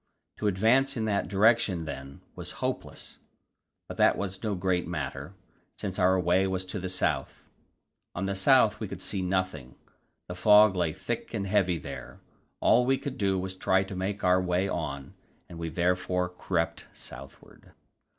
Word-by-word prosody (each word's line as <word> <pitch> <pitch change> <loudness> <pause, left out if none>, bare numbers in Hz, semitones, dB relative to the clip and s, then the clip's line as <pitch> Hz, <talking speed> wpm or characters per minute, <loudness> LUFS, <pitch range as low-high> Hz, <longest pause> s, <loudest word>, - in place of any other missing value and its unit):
To 105 - -1
advance 120 +8 +3
in 110 - -1
that 100 -2 0
direction, 100 -4 +3
then, 70 -1 -8
was - - -5
hopeless, - - -5 0.7
but - - -8
that - - +4
was 95 -1 -4
no 105 -3 -1
great 90 -1 0
matter, 75 0 -5 0.4
since 95 -1 -4
our 95 0 +4
way 90 +2 +2
was 95 0 -2
to 95 +2 -4
the 95 0 -4
south. 90 - -2 0.7
On 95 - -2
the 100 - -1
south 95 -1 +4
we - - -4
could - - -8
see 95 - -2
nothing; 90 -8 -2 0.5
the 90 - -5
fog 105 +2 +6
lay 85 -3 +1
thick 95 +7 -5
and 100 -2 -2
heavy 95 -3 +2
there. - - -9 0.4
All 125 - +5
we 135 +2 +2
could 140 0 -6
do 95 -2 +1
was 95 0 -3
to 95 - -18
try 95 0 +3
to 95 0 -8
make 95 +2 -3
our 90 0 +4
way 90 +1 0
on, 70 -7 -4 0.3
and 85 - -10
we 85 -1 -3
therefore 90 +1 0
crept 90 -1 -2
southward. 70 0 -11
95 Hz, 170 wpm, -28 LUFS, 90-100 Hz, 0.7 s, fog